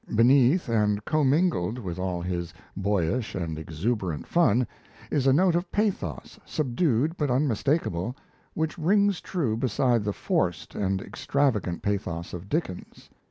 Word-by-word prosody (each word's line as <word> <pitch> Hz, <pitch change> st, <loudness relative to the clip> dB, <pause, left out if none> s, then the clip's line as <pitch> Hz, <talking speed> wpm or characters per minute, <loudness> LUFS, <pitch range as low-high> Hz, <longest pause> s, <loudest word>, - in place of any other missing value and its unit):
Beneath 130 Hz, -, +5 dB
and 105 Hz, -2 st, +1 dB
commingled 145 Hz, -, +2 dB
with 90 Hz, -7 st, -5 dB
all 90 Hz, -2 st, -2 dB
his 85 Hz, -2 st, -3 dB, 0.2 s
boyish 100 Hz, +3 st, 0 dB
and 80 Hz, -4 st, -3 dB
exuberant 85 Hz, +2 st, -2 dB
fun 125 Hz, -8 st, +3 dB, 0.5 s
is 135 Hz, -2 st, +1 dB
a -, -, +6 dB
note 175 Hz, +6 st, +4 dB
of 175 Hz, +1 st, -1 dB
pathos 195 Hz, -, -2 dB
subdued 150 Hz, +1 st, 0 dB
but 145 Hz, -2 st, 0 dB
unmistakable, 125 Hz, -, 0 dB, 0.4 s
which 160 Hz, +2 st, -2 dB
rings 200 Hz, +3 st, +3 dB
true 145 Hz, -, -1 dB
beside 120 Hz, -1 st, +1 dB
the 105 Hz, -, -1 dB
forced -, -, -1 dB
and 95 Hz, -1 st, -1 dB
extravagant 130 Hz, -10 st, -1 dB
pathos 90 Hz, -5 st, -2 dB
of 90 Hz, +2 st, -7 dB
Dickens. 145 Hz, -, -4 dB
120 Hz, 130 wpm, -26 LUFS, 95-150 Hz, 0.5 s, a